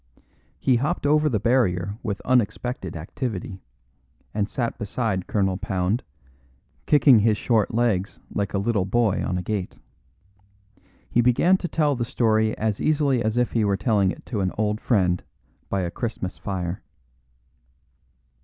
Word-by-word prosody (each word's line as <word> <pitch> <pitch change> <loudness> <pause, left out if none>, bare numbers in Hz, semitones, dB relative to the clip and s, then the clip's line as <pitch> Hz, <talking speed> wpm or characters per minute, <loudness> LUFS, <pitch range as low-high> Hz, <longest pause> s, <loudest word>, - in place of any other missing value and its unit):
He 130 -2 +3
hopped 140 +3 -1
over 150 +1 +3
the 110 -6 0
barrier 100 -4 +1
with 100 -2 -3
unexpected 120 -5 0
activity, 95 +2 -5 0.7
and 105 0 -1
sat 120 -2 -3
beside 105 -3 -2
Colonel 95 -3 0
Pound, 95 +3 -1 0.9
kicking 135 -5 +6
his 105 0 +3
short 110 -3 +1
legs 110 -5 0 0.2
like 100 0 -2
a - - +2
little 100 -1 0
boy 110 0 +1
on 90 - -1
a 90 - -3
gate. 100 -1 -3 1.3
He 120 - +2
began 125 +10 +4
to 180 - -4
tell 150 -4 +1
the 120 - -1
story 110 -2 +1
as 110 -2 -1
easily 145 -5 +2
as 110 +2 -1
if 125 0 +1
he 115 - +1
were 100 -1 +1
telling 100 -4 +2
it - - -6
to 110 -6 -3
an 95 -1 0
old 105 0 0
friend 90 -7 +1 0.5
by 100 - 0
a 85 -1 -2
Christmas 110 -5 -4
fire. 90 -2 -4
110 Hz, 150 wpm, -24 LUFS, 95-120 Hz, 1.3 s, kicking